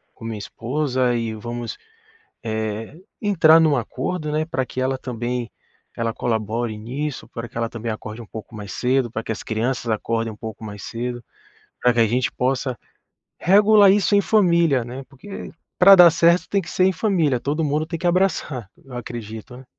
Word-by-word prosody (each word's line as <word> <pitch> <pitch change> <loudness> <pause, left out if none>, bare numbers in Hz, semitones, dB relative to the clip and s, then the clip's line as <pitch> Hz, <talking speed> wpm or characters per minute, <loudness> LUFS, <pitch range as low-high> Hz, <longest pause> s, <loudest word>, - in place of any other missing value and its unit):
com 115 - -11
minha 115 -2 -4
esposa 125 +2 -1
e 115 -1 -2
vamos, 120 +2 -5 0.7
eh, 110 +4 -3 0.2
entrar 165 -6 +5
num 155 -3 +4
acordo, 150 +6 -3
né, 155 +1 0
pra 160 -5 -2
que 130 - -5
ela 130 +1 0
também 120 -1 -4 0.5
ela 115 -1 -1
colabore 110 0 -2
nisso, 135 +6 -4
pra 115 0 -7
que 115 - -21
ela 115 0 0
também 115 0 -5
acorde 110 +1 -6
um - - -12
pouco 110 +1 -9
mais 105 -1 -7
cedo, 125 -1 +1
pra 110 0 -4
que - - -2
as 110 - -6
crianças 120 +2 -2
acordem 115 +1 -1
um - - -12
pouco 110 0 -8
mais 105 -1 -7
cedo, 120 0 -5 0.6
pra 125 - +4
que 120 - +1
a 115 - +5
gente 125 +3 0
possa 130 0 -1 0.6
regular 205 +1 +6
isso 205 0 +2
em - - +6
família, 170 - +3
né, 130 +3 -7
porque 140 +9 -9 0.3
pra 195 +2 +9
dar 175 -2 +9
certo 170 +2 +3
tem 200 - +1
que - - -9
ser 185 - +2
em 190 - +4
família, 170 - +1
todo 150 +5 -1
mundo 150 +2 0
tem 165 -1 -4
que 180 - -3
abraçar, 170 - 0 0.2
eu 130 -2 -9
acredito, 115 0 -7
né. 130 - -13
125 Hz, 190 wpm, -22 LUFS, 115-160 Hz, 0.7 s, pra